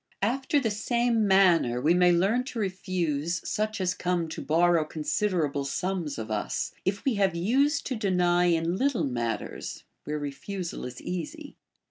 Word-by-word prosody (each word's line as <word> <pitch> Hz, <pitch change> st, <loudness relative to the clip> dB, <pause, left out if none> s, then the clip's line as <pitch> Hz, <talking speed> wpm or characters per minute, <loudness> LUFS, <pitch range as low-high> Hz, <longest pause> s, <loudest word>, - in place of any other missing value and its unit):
After 265 Hz, +6 st, +1 dB
the 230 Hz, -6 st, 0 dB
same 230 Hz, +1 st, +1 dB
manner 175 Hz, -11 st, +4 dB
we 155 Hz, +7 st, +3 dB
may 180 Hz, 0 st, +5 dB
learn 195 Hz, +8 st, +2 dB
to 255 Hz, -, -7 dB
refuse 175 Hz, -5 st, -1 dB
such 215 Hz, 0 st, -1 dB
as 180 Hz, -1 st, +1 dB
come 175 Hz, -2 st, -1 dB
to -, -, -6 dB
borrow 170 Hz, +1 st, +3 dB
considerable 155 Hz, -2 st, -1 dB
sums 175 Hz, +2 st, -2 dB
of 110 Hz, -1 st, -5 dB
us, 105 Hz, -1 st, -2 dB
if 195 Hz, +1 st, -2 dB
we 270 Hz, -, +3 dB
have 190 Hz, -3 st, +2 dB
used 275 Hz, -, +2 dB
to 260 Hz, -, -2 dB
deny 180 Hz, -4 st, +2 dB
in 170 Hz, +1 st, +1 dB
little 270 Hz, +1 st, +1 dB
matters 120 Hz, -3 st, -4 dB, 0.2 s
where 150 Hz, 0 st, -2 dB
refusal 165 Hz, +6 st, -5 dB
is 125 Hz, 0 st, -7 dB
easy. 295 Hz, -, -5 dB
180 Hz, 155 wpm, -27 LUFS, 160-215 Hz, 0.2 s, may